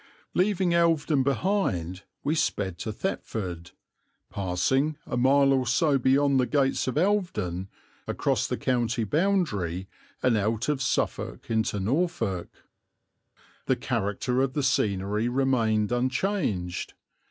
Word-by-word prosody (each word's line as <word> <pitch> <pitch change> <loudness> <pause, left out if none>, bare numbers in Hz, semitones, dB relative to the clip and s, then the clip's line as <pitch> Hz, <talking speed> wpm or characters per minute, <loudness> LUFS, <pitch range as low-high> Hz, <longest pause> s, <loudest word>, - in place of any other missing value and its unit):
Leaving 185 -2 +2
Elvedon 165 -4 +3
behind 130 - 0 0.2
we 145 - +1
sped 95 - -1
to 110 - -3
Thetford, 95 - -4 0.6
passing, 130 +11 0
a - - -4
mile 135 +2 +4
or 130 -2 +1
so 140 +3 +3
beyond 135 +1 +3
the 125 - +2
gates 135 -3 +1
of 130 - -1
Elvedon, 150 - 0 0.4
across - - 0
the - - -2
county 120 -2 0
boundary 110 - 0 0.4
and 125 -3 +4
out 110 +2 0
of 145 -3 0
Suffolk 130 - -2
into 110 -2 0
Norfolk. 110 - -1 1.2
The - - +3
character 105 +6 -1
of 135 -1 0
the 145 - -1
scenery 105 -2 +1
remained 120 -5 +1
unchanged. 120 - -1
130 Hz, 120 wpm, -27 LUFS, 100-145 Hz, 1.2 s, mile